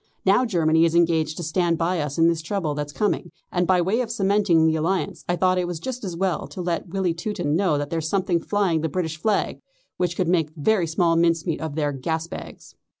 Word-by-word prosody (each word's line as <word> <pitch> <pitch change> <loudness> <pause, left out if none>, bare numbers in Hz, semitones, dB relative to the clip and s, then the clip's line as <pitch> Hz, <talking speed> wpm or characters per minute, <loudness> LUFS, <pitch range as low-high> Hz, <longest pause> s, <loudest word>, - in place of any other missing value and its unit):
Now 200 +7 +4
Germany 165 -6 +3
is 165 0 +2
engaged 160 -2 +2
to 175 - -4
stand 170 +1 +1
by 170 0 0
us 145 -1 -4
in 165 0 +5
this 165 -1 +1
trouble 165 -3 -2
that's 145 0 -4
coming, 200 -1 -1 0.2
and 180 -1 0
by 185 -1 +4
way 200 +8 +1
of 235 - -3
cementing 200 -6 +2
the 160 0 +3
alliance 170 +4 -1
I 175 - +2
thought 185 0 +2
it 180 - -1
was 175 -2 -4
just 255 +4 -5
as 180 -4 -4
well 185 -3 -1
to 190 - -10
let 170 0 -2
the - - -15
wily 185 -3 +1
Teuton 170 -4 -2
know 175 -4 +2
that 145 0 -4
there's 160 -1 -2
something 185 -2 +1
flying 185 -3 0
the 160 - -1
British 160 -1 -2
flag 215 0 0 0.4
which 175 -1 -1
could 180 - +1
make 165 -3 +1
very 175 +3 +1
small 165 +1 +2
mincemeat 165 0 +1
of 160 -2 -4
their 150 -2 0
gas 160 +4 -2
bags." - - -10
170 Hz, 230 wpm, -23 LUFS, 160-185 Hz, 0.4 s, in